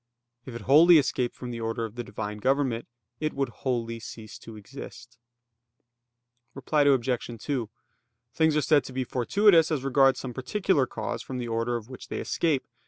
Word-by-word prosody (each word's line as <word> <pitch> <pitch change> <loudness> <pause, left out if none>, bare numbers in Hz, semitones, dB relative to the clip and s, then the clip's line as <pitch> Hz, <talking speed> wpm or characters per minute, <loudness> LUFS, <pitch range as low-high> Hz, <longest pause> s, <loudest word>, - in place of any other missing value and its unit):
If 125 - -7
it 120 - -6
wholly 160 +8 +7
escaped 130 -4 0
from 125 -1 -7
the 115 - -5
order 115 0 -2
of 110 - -8
the 120 +1 -5
Divine 105 -2 -6
government, 130 -1 0 0.3
it 155 0 -2
would 135 -2 -1
wholly 115 -1 -3
cease 110 -1 -10
to 115 - -11
exist. 120 +1 -11 1.4
Reply 145 +2 0
Obj. 130 -3 +2
2: 125 -6 -3 0.6
Things 160 0 +2
are - - +3
said 150 0 +3
to 130 - -8
be 130 0 -1
fortuitous 165 - +3
as 150 -5 -1
regards 135 0 +3
some 125 -2 -6
particular 140 - 0
cause 115 +1 -4
from 130 +2 -6
the 120 -1 -4
order 115 +1 -1
of 115 -2 -5
which 130 0 -10
they - - -5
escape. 155 -6 0
130 Hz, 175 wpm, -27 LUFS, 115-145 Hz, 1.4 s, wholly